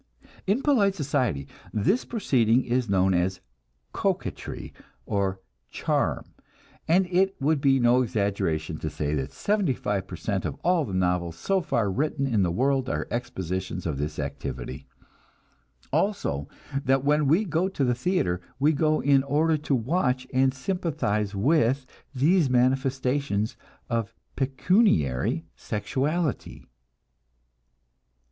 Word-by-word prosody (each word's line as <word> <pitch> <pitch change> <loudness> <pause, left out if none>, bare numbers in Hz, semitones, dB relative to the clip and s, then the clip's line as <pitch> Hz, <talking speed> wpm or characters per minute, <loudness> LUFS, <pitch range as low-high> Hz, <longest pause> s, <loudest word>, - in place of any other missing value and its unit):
In 215 +8 +1
polite 210 -10 +3
society 130 - -1 0.2
this 150 - +1
proceeding 130 - +2
is 125 -2 0
known 95 -1 +3
as 90 +1 0 0.5
"coquetry," - - -3 0.3
or 95 -1 -1 0.3
"charm," - - -1 0.6
and 180 +4 +4
it 185 +2 +1
would 145 +1 +1
be 135 -1 +4
no 120 +1 +4
exaggeration 95 -8 -1
to 80 - -3
say 75 -1 -2
that 70 -3 -2
seventy 200 -10 0
five 100 -3 -2
per - - -7
cent 100 -3 -2
of - - -3
all 175 -3 +3
the 100 - -6
novels 90 -2 0
so 190 - 0
far 120 - 0
written 145 +5 -1
in 115 -6 +1
the 90 - +2
world 130 +7 +1
are - - -2
expositions 95 -6 -3
of 75 -5 -2
this 75 +1 -3
activity; 70 -3 -5 1.1
also 190 - 0 0.3
that 135 0 +2
when 150 0 +3
we 170 +10 +3
go 170 +1 +1
to 170 -7 -2
the 125 -2 +3
theater, 120 - 0 0.2
we 145 +4 +3
go 155 +1 +2
in 140 -1 +4
order 150 +4 +2
to 150 -2 0
watch 130 0 0
and 130 +1 +4
sympathize 130 - -2
with 130 +3 +2 0.3
these 155 +3 +3
manifestations 130 -3 +1 0.3
of 115 -1 -2 0.2
pecuniary 130 - +2
sexuality. 140 +7 -2
130 Hz, 130 wpm, -26 LUFS, 95-155 Hz, 1.1 s, and